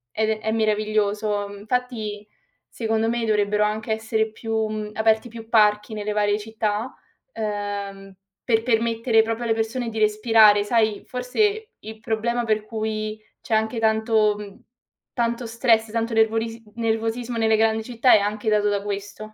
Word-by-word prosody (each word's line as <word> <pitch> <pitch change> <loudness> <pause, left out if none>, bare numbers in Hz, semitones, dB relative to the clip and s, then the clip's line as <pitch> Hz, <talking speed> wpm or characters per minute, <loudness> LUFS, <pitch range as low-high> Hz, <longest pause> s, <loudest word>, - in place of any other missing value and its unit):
è 220 0 0
è 220 0 -2
meraviglioso. 210 -1 0
Infatti 215 -2 -3 0.4
secondo 225 -1 -1
me 235 -1 -1
dovrebbero 210 -1 +2
anche 215 +1 -3
essere 220 0 -1
più, 220 0 -2
mhmm, 215 -1 -5
aperti 220 +2 +2
più 225 0 -11
parchi 210 -1 +3
nelle 210 0 -3
varie 205 0 +1
città, 220 +2 -3 0.4
uhm, 200 -2 -5 0.3
per 225 -2 +1
permettere 230 -1 +2
proprio 225 +1 -3
alle 225 - +2
persone 225 +2 -2
di 220 -1 -5
respirare. 215 -1 +5
Sai, 215 -1 +1
forse 415 - -1
il 220 0 -10
problema 235 +2 -1
per 215 -1 0
cui 215 -1 -4 0.2
c'è 225 - -1
anche 220 +1 0
tanto, 220 -1 +2
mhmm, 205 -1 -10 0.5
tanto 235 0 -1
stress, 225 -1 +2
tanto 230 0 -2
nervoris 225 +1 +1
nervosismo 230 +1 -2
nelle 220 -1 +3
grandi 220 0 +2
città 245 +2 +3
è 210 - +7
anche 210 +2 -2
dato 210 -1 +2
da 200 -1 0
questo. 205 +1 -6
220 Hz, 150 wpm, -23 LUFS, 210-225 Hz, 0.5 s, è